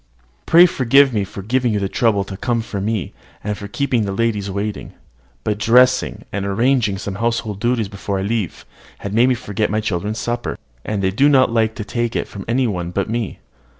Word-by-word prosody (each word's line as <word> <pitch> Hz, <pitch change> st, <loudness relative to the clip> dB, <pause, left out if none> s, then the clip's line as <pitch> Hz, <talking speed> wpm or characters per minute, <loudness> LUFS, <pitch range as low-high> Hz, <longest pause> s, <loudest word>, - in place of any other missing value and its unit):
"Pray 170 Hz, +2 st, +8 dB
forgive 135 Hz, -4 st, +4 dB
me 105 Hz, -3 st, +1 dB
for 100 Hz, 0 st, -8 dB
giving 125 Hz, +3 st, +1 dB
you 105 Hz, -, +1 dB
the 100 Hz, -, -1 dB
trouble 105 Hz, -1 st, +1 dB
to 95 Hz, 0 st, -8 dB
come 115 Hz, +4 st, -1 dB
for 100 Hz, -3 st, -5 dB
me, 105 Hz, -2 st, -2 dB, 0.3 s
and 105 Hz, 0 st, -2 dB
for 100 Hz, 0 st, -8 dB
keeping 130 Hz, +2 st, 0 dB
the 100 Hz, -, -2 dB
ladies 105 Hz, -1 st, -1 dB
waiting: 100 Hz, +1 st, -4 dB, 0.5 s
but 105 Hz, -1 st, -1 dB
dressing, 125 Hz, +4 st, +3 dB
and 100 Hz, 0 st, -2 dB
arranging 110 Hz, +1 st, +1 dB
some 100 Hz, 0 st, -5 dB
household 115 Hz, -3 st, -1 dB
duties 120 Hz, -2 st, 0 dB
before 100 Hz, 0 st, -4 dB
I 95 Hz, -, -2 dB
leave, 105 Hz, -3 st, -2 dB, 0.4 s
had 100 Hz, -, -5 dB
made 120 Hz, +4 st, +4 dB
me 130 Hz, -, +3 dB
forget 105 Hz, -3 st, -2 dB
my 110 Hz, -, 0 dB
children's 105 Hz, +1 st, -2 dB
supper; 120 Hz, +1 st, -3 dB, 0.3 s
and 105 Hz, -2 st, -2 dB
they 95 Hz, -, +2 dB
do 135 Hz, +9 st, +4 dB
not 130 Hz, -4 st, +4 dB
like 110 Hz, -1 st, +1 dB
to 110 Hz, -, -4 dB
take 120 Hz, +2 st, -2 dB
it -, -, -1 dB
from 100 Hz, -, -9 dB
any 125 Hz, +3 st, +1 dB
one 90 Hz, -6 st, -2 dB
but 100 Hz, +3 st, -2 dB
me." 115 Hz, -3 st, -3 dB
110 Hz, 210 wpm, -19 LUFS, 100-120 Hz, 0.5 s, Pray